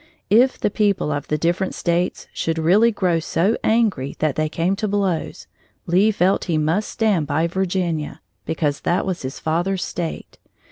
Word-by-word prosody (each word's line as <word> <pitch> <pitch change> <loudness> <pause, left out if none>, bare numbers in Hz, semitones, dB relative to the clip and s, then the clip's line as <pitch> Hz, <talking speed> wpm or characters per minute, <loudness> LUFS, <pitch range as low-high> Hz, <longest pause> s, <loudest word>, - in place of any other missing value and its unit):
If 250 +5 +4
the 210 - 0
people 200 -7 +1
of 145 0 -3
the 150 - 0
different 175 +4 -1
States 175 +1 -1
should 165 0 -2
really 195 +9 +4
grow 180 -5 +1
so 170 +6 +1
angry 215 - +1
that 155 -3 0
they 155 0 0
came 170 +5 0
to 215 - -1
blows, 195 -5 -2 0.4
Lee 185 +5 +3
felt 195 -2 +1
he 165 -4 0
must 160 +7 0
stand 205 -10 +1
by 155 +3 +1
Virginia, 175 -3 -2 0.2
because 150 -3 -1
that 175 +3 0
was 185 -2 -3
his 130 0 -5
father's 175 +4 -1
State. 170 -2 -5
175 Hz, 170 wpm, -21 LUFS, 160-195 Hz, 0.4 s, If